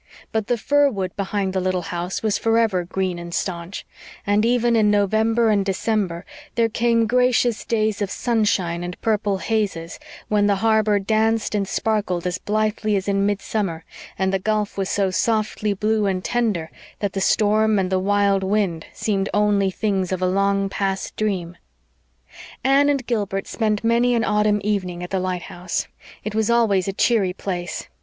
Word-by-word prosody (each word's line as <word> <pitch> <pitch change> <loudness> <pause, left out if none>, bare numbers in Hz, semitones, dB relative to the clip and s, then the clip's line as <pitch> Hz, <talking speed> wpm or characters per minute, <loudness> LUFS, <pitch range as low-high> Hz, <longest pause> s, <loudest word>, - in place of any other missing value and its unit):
But 220 -1 -1
the 245 - +1
fir 285 +5 +3
wood 190 -6 -4
behind 200 -1 -2
the 190 - 0
little 185 -1 -1
house 175 +4 -3
was 215 -2 +1
forever 225 -5 +2
green 185 -1 -2
and 170 0 -8
staunch; 170 +1 -4 0.4
and 205 +1 +2
even 240 0 +2
in 215 -2 +4
November 220 +3 +2
and 200 -2 +2
December 195 -2 -1 0.3
there 230 -1 +2
came 230 0 +2
gracious 245 -1 +2
days 215 -2 0
of 200 - -1
sunshine 195 -8 0
and 175 0 -6
purple 210 -3 0
hazes, 195 -6 -2 0.3
when 205 -1 +2
the 200 - +3
harbor 215 0 +2
danced 220 +2 +1
and 200 -2 0
sparkled 200 -6 -1
as 180 0 -2
blithely 215 0 0
as 195 0 -2
in 200 0 +2
midsummer, 200 -4 -2 0.3
and 190 0 0
the 195 - +1
gulf 210 +1 -1
was 195 -1 -2
so 195 -2 +1
softly 215 0 0
blue 210 +1 +1
and 185 -1 -1
tender 215 -10 -1 0.3
that 205 -2 -2
the 195 - -2
storm 215 +1 +3
and 190 -1 0
the 190 - +2
wild 200 0 +2
wind 190 -5 0
seemed 200 -2 -1
only 205 -2 +3
things 190 -2 -1
of 185 - -1
a 185 - 0
long 195 +1 +1
past 195 0 -3
dream. 185 -5 -2 1.1
Anne 275 +2 +4
and 275 -3 0
Gilbert 205 -5 -2
spent 215 -2 -1
many 235 +2 +3
an 230 - +1
autumn 210 -1 +2
evening 185 -4 -2
at 180 - -7
the 190 - 0
lighthouse. 180 -1 -3 0.4
It 215 - -4
was 220 +1 0
always 220 -6 +3
a - - 0
cheery 200 -3 +2
place. 180 -2 -5
205 Hz, 170 wpm, -22 LUFS, 190-220 Hz, 1.1 s, in